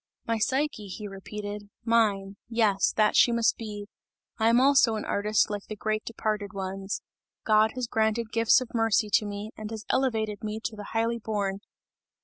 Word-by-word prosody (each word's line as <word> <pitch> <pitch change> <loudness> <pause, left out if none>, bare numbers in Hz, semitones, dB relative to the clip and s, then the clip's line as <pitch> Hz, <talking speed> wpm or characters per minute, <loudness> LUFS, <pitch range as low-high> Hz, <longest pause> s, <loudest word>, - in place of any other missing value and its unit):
"My 230 -1 0
Psyche," 260 -2 0
he 205 +2 -6
repeated, 205 +1 -7 0.2
"mine, 205 -4 +2
yes, 220 -4 +2
that 215 -1 +3
she 240 - +6
must 235 -2 +2
be! 210 -2 -6 0.5
I 220 +1 +4
am 235 +1 +5
also 265 -4 +5
an 215 - -4
artist 210 +1 +1
like 205 -1 -5
the 215 - -5
great 215 +1 -2
departed 215 -2 -3
ones! 195 0 -4 0.4
God 215 0 +4
has 255 -1 -2
granted 220 0 0
gifts 230 +2 +4
of 250 - -7
mercy 225 -2 +2
to 210 - +3
me, 205 +1 -6
and 215 -1 -7
has 220 -1 -7
elevated 220 -5 0
me 215 0 -3
to 225 - -3
the 205 -1 -8
highly 230 +1 +1
born!" 200 -3 -2
215 Hz, 175 wpm, -27 LUFS, 205-230 Hz, 0.5 s, she